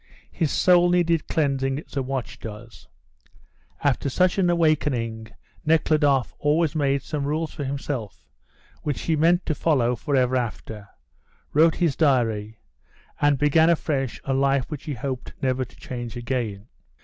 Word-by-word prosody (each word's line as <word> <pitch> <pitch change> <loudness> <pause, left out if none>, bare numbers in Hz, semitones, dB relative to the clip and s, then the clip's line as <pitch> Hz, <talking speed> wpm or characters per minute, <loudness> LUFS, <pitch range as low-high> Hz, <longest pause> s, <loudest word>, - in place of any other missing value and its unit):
His 160 -5 -1
soul 175 -1 +4
needed 170 -3 +2
cleansing 140 -2 0
as - - -16
a 135 - +1
watch 125 -3 -4
does. 110 +1 -10 1.0
After 140 -1 +1
such 180 +7 +2
an 180 -2 +3
awakening 135 -9 0 0.4
Nekhludoff 150 -4 +2
always 150 +1 +2
made 140 -3 0
some 150 -2 -3
rules 155 +2 -2
for 145 - -5
himself 135 - -5 0.6
which 145 -3 -3
he 165 - 0
meant 170 +4 +3
to 155 - 0
follow 130 -6 +1
forever 130 0 +1
after, 110 -4 -4 0.6
wrote 160 +2 +5
his 170 -6 +1
diary, 115 -8 +1 0.6
and 145 -1 +4
began 155 +3 +4
afresh 140 -6 0
a 135 - -1
life 135 +1 +1
which 145 -3 -6
he 150 - -3
hoped 130 +2 -5
never 130 -1 0
to 125 - -13
change 120 -2 -7
again. 120 -5 -3
140 Hz, 145 wpm, -24 LUFS, 125-155 Hz, 1.0 s, wrote